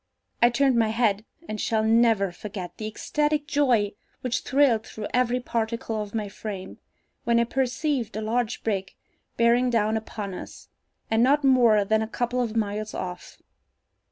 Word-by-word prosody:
I 240 - +7
turned 260 +1 +2
my 225 -1 +3
head, 220 -2 +1 0.2
and 215 -1 -4
shall 220 -1 +1
never 220 -3 +3
forget 185 -1 -7
the 215 - -4
ecstatic 295 +6 -1
joy 255 -10 +2 0.3
which 250 -2 -1
thrilled 260 -5 +2
through 215 - -7
every 250 0 +2
particle 230 -2 -2
of 210 +1 -7
my 215 -2 -1
frame, 195 -1 -7 0.4
when 235 0 +3
I - - +4
perceived 255 -1 -1
a 215 - -2
large 230 +1 -1
brig 195 -4 -2 0.4
bearing 235 +2 +4
down 220 -2 +1
upon 210 -3 -6
us, - - -10 0.4
and 225 +1 +3
not 280 +4 +4
more 240 -6 +5
than 220 +2 +2
a 220 - -2
couple 245 +2 -1
of 230 -2 -2
miles 215 -1 -2
off. 180 -1 -6
225 Hz, 160 wpm, -25 LUFS, 215-245 Hz, 0.4 s, I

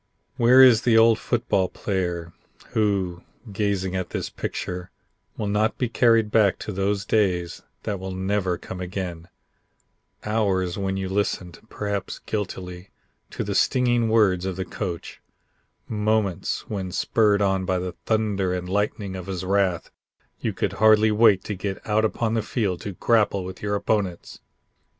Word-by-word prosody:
Where 125 +3 +7
is 120 -3 +7
the 115 -3 +4
old 115 0 +5
football 105 -6 0
player, 90 -4 -3 0.4
who, 95 -5 0 0.3
gazing 95 -2 -1
at 95 -2 -2
this - - -4
picture, 90 0 -5 0.5
will 105 - -2
not 105 +2 +1
be 125 - -1
carried 115 -2 +3
back 105 -4 +4
to - - -4
those 100 +1 -1
days 90 -5 0 0.2
that 100 -3 -3
will 95 +1 -5
never 95 -1 -1
come 90 +1 -8
again; 90 -2 -5 1.0
hours 100 -5 0
when 95 -1 -2
you 95 -1 -2
listened 95 -3 -2
perhaps 100 -2 -3
guiltily 90 -3 -5 0.4
to - - -4
the - - -3
stinging 120 -3 +2
words 100 -5 +3
of 95 -1 -3
the 95 +1 -3
coach; 85 -1 -6 0.7
moments 105 -4 -1
when 95 -3 -4
spurred 105 +2 +2
on 95 -1 +1
by 95 0 0
the 90 0 -3 0.2
thunder 100 -4 +1
and 90 0 -4
lightning 100 0 -1
of 95 0 -7
his 95 -2 -4
wrath 95 -3 0 0.5
you - - -1
could - - -2
hardly 110 +2 +5
wait 105 -3 +5
to 105 - -4
get 95 0 -4
out 110 0 +2
upon 110 +1 0
the 115 - +1
field 105 -5 -2
to 100 - -5
grapple 100 -2 +2
with 95 0 -8
your 105 0 -1
opponents. 100 -4 -2
100 Hz, 155 wpm, -24 LUFS, 95-110 Hz, 1.0 s, Where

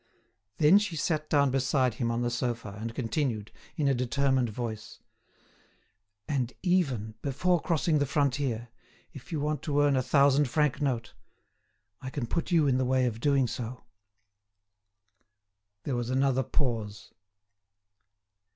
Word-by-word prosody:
Then 160 +6 +6
she 205 -5 -3
sat 155 -1 -1
down 140 -3 +3
beside 130 -1 +1
him 115 +1 -2
on 115 +1 -1
the 120 - -1
sofa, 115 -4 -3
and 115 0 -5
continued, 115 -3 -2 0.2
in 145 - 0
a 135 - +4
determined 130 0 +1
voice: 110 -1 -6 1.3
"And 130 -4 -1
even, 140 - +1
before 165 +6 +1
crossing 160 -2 +1
the 145 - +1
frontier, 135 -4 0 0.4
if 140 +5 -12
you 160 - -1
want 150 +1 -1
to 145 -2 0
earn 145 -1 +3
a 130 - +2
thousand 140 +1 +3
franc 150 0 +1
note, 125 -6 -1 0.9
I 130 - -5
can 130 -2 -3
put 170 +10 -2
you 165 -4 +3
in 130 -2 +2
the - - +2
way 130 0 +2
of 115 -2 -2
doing 140 0 +2
so." 120 +1 -5 2.0
There 135 - -2
was 120 0 -2
another 130 0 +2
pause. 115 -6 -3
130 Hz, 140 wpm, -28 LUFS, 120-145 Hz, 2.0 s, Then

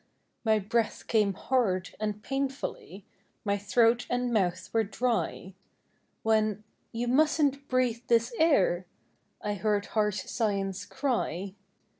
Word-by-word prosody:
My 220 -2 +4
breath 215 +2 -1
came 210 -4 +2
hard 195 -9 0
and 210 0 -3
painfully, 270 - -4 0.4
My 200 -1 +2
throat 230 +4 +3
and 245 0 0
mouth 185 -5 +1
were 225 -1 +3
dry, 220 -3 -2 0.7
When, 215 -1 +2
" - - -44
You 235 +1 -2
mustn't 280 +1 +2
breathe 250 -2 +1
this 235 +1 +3
air, 190 - +3 0.5
,r 210 - -2
I - - 0
heard 205 0 0
harsh 210 -2 +1
Science 195 -4 -1
cry. 200 - -2
220 Hz, 125 wpm, -29 LUFS, 200-245 Hz, 0.7 s, My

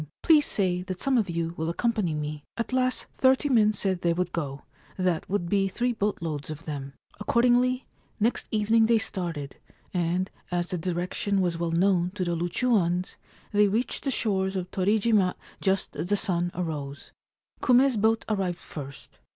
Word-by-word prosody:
Please 305 -3 +5
say 180 -3 +1
that 185 0 -5
some 275 -1 +2
of 215 -6 +2
you 165 0 -2
will 160 +1 -1
accompany 210 -3 0
me/ 150 0 -4
At 235 +2 -3
last 255 0 +1
thirty 265 +2 +3
men 220 -5 +5
said 190 -3 -1
they 170 -1 +2
would 180 0 -1
go; 140 -4 -4 0.3
that 180 -3 0
would 185 -3 -1
be 195 +1 +2
three 240 +5 -1
boat 205 -5 -2
loads 150 -3 -4
of 155 +1 -7
them. 140 -3 -5 0.3
Accordingly, 245 +3 +2 0.3
next 225 +3 +1
evening 220 +1 +3
they 230 0 +4
started, 170 -10 -3 0.4
and, 180 +1 0 0.2
as 175 0 -1
the 180 - -2
direction 180 +3 -1
was 175 -3 0
well 170 -1 0
known 175 +1 +2
to 190 - -1
the 175 0 0
Loochooans, 175 0 0 0.4
they 210 -1 +4
reached 220 +5 -1
the 275 - 0
shores 195 -6 0
of 180 -1 -3
Torijima 205 0 +2 0.3
just 190 -1 0
as 175 - -3
the 205 +2 +2
sun 175 -4 0
arose. 150 -5 -5 0.5
Kume's 255 0 +4
boat 220 +1 +2
arrived 190 -5 -1
first. 140 -5 -10
185 Hz, 170 wpm, -27 LUFS, 170-220 Hz, 0.5 s, Please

